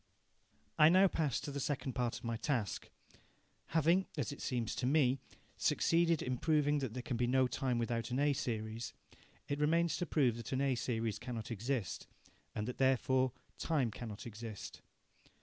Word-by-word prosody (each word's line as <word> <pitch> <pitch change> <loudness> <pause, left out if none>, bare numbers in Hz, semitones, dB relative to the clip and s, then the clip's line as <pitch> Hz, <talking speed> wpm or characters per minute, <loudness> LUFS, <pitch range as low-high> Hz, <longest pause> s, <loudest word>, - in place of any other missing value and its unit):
I 155 - +9
now 190 +3 +6
pass 155 -8 0
to 145 - -5
the 140 - -3
second 135 -1 -2
part 120 -2 -1
of - - -12
my 115 -1 -2
task. 115 - -2 0.8
Having, 165 +4 +3
as 145 -3 -1
it 145 - -8
seems 120 -3 -1
to 125 - 0
me, 135 -2 +3 0.4
succeeded 165 -1 +2
in 125 -1 -2
proving 150 -2 +2
that 130 -4 -4
there 125 - -4
can 125 -4 -2
be 120 0 +1
no 130 +1 +4
time 125 -1 -1
without 115 0 -1
an 125 - -1
A 145 +1 +3
series, 115 -2 -3 0.5
it 145 0 -2
remains 165 +3 +2
to 175 - -2
prove 125 -7 +2
that 120 - -5
an 130 - +1
A 140 -1 +2
series 115 -3 -1
cannot 120 -2 -5
exist, 115 -1 -2 0.5
and 105 +1 -2
that 125 - -5
therefore 130 0 +3 0.3
time 140 -8 +1
cannot 110 +2 -7
exist. 110 -2 -7
130 Hz, 175 wpm, -35 LUFS, 115-145 Hz, 0.8 s, I